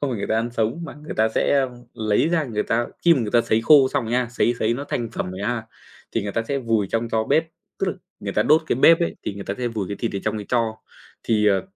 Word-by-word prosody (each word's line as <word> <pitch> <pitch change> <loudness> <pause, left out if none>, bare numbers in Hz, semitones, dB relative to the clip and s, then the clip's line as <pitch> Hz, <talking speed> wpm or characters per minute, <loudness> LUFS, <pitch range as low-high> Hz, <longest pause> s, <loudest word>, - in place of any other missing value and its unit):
không 145 - -1
phải 120 - -2
người 100 - -3
ta - - 0
ăn 115 +1 -1
sống 115 +6 -1
mà 160 - -8
người 150 +1 -8
ta 110 +1 +3
sẽ, - - +2
a, 135 - +1 0.3
lấy 110 +5 +1
ra 165 -2 +1
người 110 -5 -2
ta 120 +1 0 0.2
khi 170 -1 +7
mà 135 - 0
người 110 -3 -2
ta 120 - +4
sấy 110 -1 +1
khô 135 +2 +6
xong 135 -2 -1
rồi 115 - -4
nha, 125 -1 +1
sấy 120 0 +1
sấy 110 +2 +1
nó 140 +4 -5
thành 120 -4 -3
phẩm 90 - -4
rồi 95 +1 -7
ha, 115 +1 -2 0.5
thì - - 0
người 100 0 -4
ta 115 - 0
sẽ 140 - 0
vùi 115 -5 0
trong 115 +1 -1
tro 110 -1 0
bếp, 150 +7 +2 0.3
tức - - 0
là - - 0 0.3
người - - -4
ta - - +2
đốt 155 +2 +4
cái - - 0
bếp 165 +6 +6
ấy 170 - -1
thì - - -4
người 100 0 -7
ta 100 - -3
sẽ 125 -1 -1
vùi 105 -5 -4
cái 100 - -4
thịt 115 - -1
ở - - 0
trong - - -1
cái 105 -2 -6
tro. 115 -3 0 0.5
Thì, 105 -2 +2
ờ, 95 -2 +3
115 Hz, 305 wpm, -23 LUFS, 110-135 Hz, 0.5 s, khi